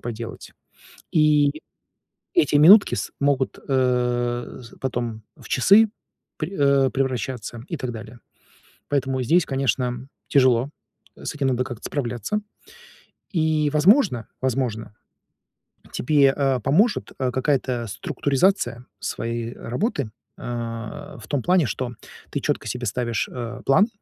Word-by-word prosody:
поделать. 115 -1 -7 0.6
И 150 -1 +3 0.7
эти 345 - +3
минутки 190 +8 +8
с - - -4
могут, 140 -2 +1
э, 125 -2 0
з 115 - -14
потом 120 -4 -3
в - - -14
часы 200 - +5 0.5
пре 170 +5 -4
э, 140 -2 +4
превращаться 125 -3 -3
и 165 - -3
так 125 -2 -4
далее. 115 +1 -9 0.7
Поэтому 135 -2 0
здесь, 165 +7 +3
конечно, 130 -1 -1 0.2
тяжело, 130 -1 +3 0.5
с - - -6
этим 140 -2 0
надо 125 -1 +1
как-то 120 -3 -8
справляться. 125 - -2 0.9
И, 155 -2 +2
возможно, 155 - +4
возможно, 120 -5 -2 1.0
тебе, 140 0 +3
а, 135 -3 +1
поможет, 190 - +2
а, 130 -2 0
какая-то 130 -3 0
структуризация 135 - 0
своей 115 0 -3
работы. 130 - -2 0.3
Э, 115 -2 -6
в - - -11
том 140 -4 -1
плане, 180 -5 +3
что 125 0 -3 0.4
ты - - -2
чётко - - -2
себе - - -3
ставишь, 120 +1 -1
э, 125 0 -6
план, 195 +11 +5
130 Hz, 120 wpm, -23 LUFS, 120-145 Hz, 1.0 s, минутки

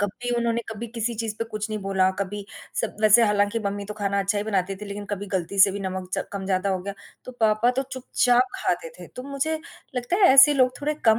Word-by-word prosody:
कभी 210 +5 -3
उन्होंने 235 0 0
कभी 220 +2 -6
किसी 230 0 -3
चीज़ 220 -1 -3
पे 230 - -1
कुछ 215 -1 -5
नहीं 215 - -2
बोला, 190 -1 +2
कभी 200 +1 -4 0.4
सब - - -4
वैसे 215 +2 +7
हालाँकि 205 +1 +1
मम्मी 200 0 -3
तो 210 - -7
खाना 200 -1 0
अच्छा 195 +1 0
ही 205 - -2
बनाती 195 -2 -1
थी 210 - -8
लेकिन 205 +1 -6
कभी 205 0 -3
गलती 185 +2 -4
से 195 - +7
भी 200 - -5
नमक 185 -1 -4
च - - -2
कम 200 -1 -4
ज़्यादा 190 0 0
हो 190 - 0
गया 200 +1 -5 0.3
तो 255 - -8
पापा 220 +2 +3
तो 260 +2 -1
चुपचाप 250 -1 +2
खाते - - -1
थे। - - -9
तो 250 - -5
मुझे 310 +3 -1 0.4
लगता 245 +8 -1
है 375 -7 +6
ऐसे 275 +2 +8
लोग 255 -2 +3
थोड़े 300 +1 -1
कम 220 -1 +5
210 Hz, 240 wpm, -24 LUFS, 200-240 Hz, 0.4 s, ऐसे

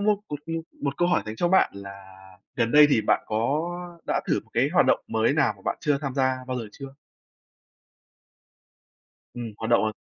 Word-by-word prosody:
một 205 0 +2
một, 145 - -4
ư, 165 - -4 0.3
một 140 -1 -2
câu 175 - +2
hỏi 175 - +2
dành 110 0 -6
cho 175 - +1
bạn 190 +2 +4
là 100 0 -8 0.6
gần 115 -1 0
đây 150 0 +8
thì 115 - +4
bạn - - +2
có 170 +10 -2
đã - - 0
thử - - +2
m - - -27
cái - - +2
hoạt - - +4
động - - +3
mới 110 +3 +1
nào 145 -6 +2
mà 95 - -20
bạn - - -1
chưa 145 -2 +1
tham 140 -4 -4
gia 130 -1 +1
bao 130 0 -3
giờ 115 -3 -6
chưa? 135 -1 -10 2.4
Ừm, 120 -3 -6
hoạt 110 - -4
động, 120 - +4
ờ 110 - 0
135 Hz, 210 wpm, -25 LUFS, 115-160 Hz, 2.4 s, đây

